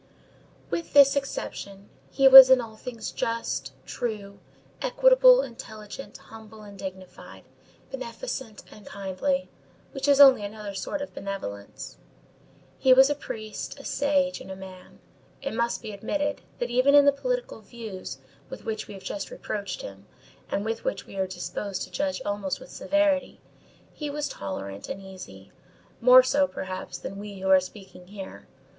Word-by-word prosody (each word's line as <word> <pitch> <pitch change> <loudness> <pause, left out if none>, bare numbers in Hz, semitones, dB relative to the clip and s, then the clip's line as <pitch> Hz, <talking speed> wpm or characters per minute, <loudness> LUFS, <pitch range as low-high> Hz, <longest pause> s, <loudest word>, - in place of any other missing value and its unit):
With 335 - -3
this 280 -1 +7
exception, 200 -7 -5 0.2
he 270 -1 +4
was 265 -1 +12
in 260 -1 +7
all 225 -2 -7
things 230 0 -7
just, 230 -12 -3
true, 205 -4 -5 0.4
equitable, - - +6
intelligent, 220 0 -9
humble 220 -1 -13
and 205 -1 -12
dignified, 190 -1 -10 0.5
beneficent 260 - -6
and 210 - -14
kindly, 200 +10 -2 0.4
which 270 -1 -3
is 285 -1 +5
only 270 -6 +8
another 205 0 -6
sort 285 +10 -4
of 285 - -9
benevolence. 100 - -7 0.8
He 260 - +6
was 265 +2 +6
a - - +3
priest, 215 -6 -7
a - - -11
sage, 280 -1 0
and - - -11
a 190 - -6
man. 185 -1 -12 0.4
It 275 - -5
must 235 +1 -1
be 215 - -6
admitted, 290 +9 -2 0.2
that 240 0 -3
even 255 +4 +4
in 285 -1 +8
the 285 - +7
political - - -3
views 205 - -8 0.3
with 265 - -9
which 220 -1 -4
we 205 - -9
have 190 - -12
just 200 -1 -5
reproached 200 -2 -5
him, 100 +1 -10 0.4
and 200 - -2
which 225 - -3
we - - -12
are 190 -1 0
disposed 185 +1 -5
to - - -10
judge 285 -2 -2
almost 205 -2 -2
with - - -13
severity, 290 0 0 0.5
he 300 -1 -5
was 295 0 -3
tolerant 100 0 -6
and - - -5
easy, 185 - -12 0.5
more 255 +2 +8
so, 280 +2 +2
perhaps, 185 -6 -6
than 195 - -7
we 205 -1 -8
who 190 - -1
are 190 - +8
speaking 185 -1 -11
here. 195 -1 -10
220 Hz, 155 wpm, -26 LUFS, 195-275 Hz, 0.8 s, was